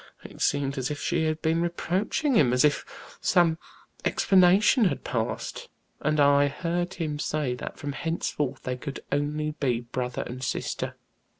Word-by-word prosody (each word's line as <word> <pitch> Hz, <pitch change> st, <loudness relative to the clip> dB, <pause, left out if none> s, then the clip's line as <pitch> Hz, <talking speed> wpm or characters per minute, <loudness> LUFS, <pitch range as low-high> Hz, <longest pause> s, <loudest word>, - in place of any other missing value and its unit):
It -, -, -11 dB
seemed 140 Hz, -1 st, +1 dB
as 130 Hz, -, -1 dB
if 150 Hz, -1 st, -4 dB
she 170 Hz, -2 st, 0 dB
had 155 Hz, 0 st, -2 dB
been 165 Hz, +1 st, +2 dB
reproaching 185 Hz, -, 0 dB
him, 140 Hz, -, +4 dB
as 125 Hz, +3 st, +4 dB
if 150 Hz, -, +2 dB, 0.4 s
some 165 Hz, -2 st, +3 dB, 0.4 s
explanation 195 Hz, +5 st, +4 dB
had 180 Hz, -, 0 dB
passed, -, -, -3 dB, 0.3 s
and 150 Hz, +1 st, 0 dB
I 145 Hz, 0 st, +5 dB
heard 175 Hz, +5 st, -2 dB
him 150 Hz, -3 st, -3 dB
say 150 Hz, -4 st, -1 dB
that 125 Hz, -, -7 dB
from 145 Hz, -, -4 dB
henceforth 145 Hz, -3 st, -2 dB
they 125 Hz, 0 st, -3 dB
could 140 Hz, +2 st, -6 dB
only 150 Hz, +2 st, 0 dB
be 125 Hz, -4 st, +1 dB
brother 125 Hz, +1 st, -3 dB
and 130 Hz, +1 st, -7 dB
sister. -, -, -3 dB
150 Hz, 160 wpm, -27 LUFS, 135-170 Hz, 0.4 s, I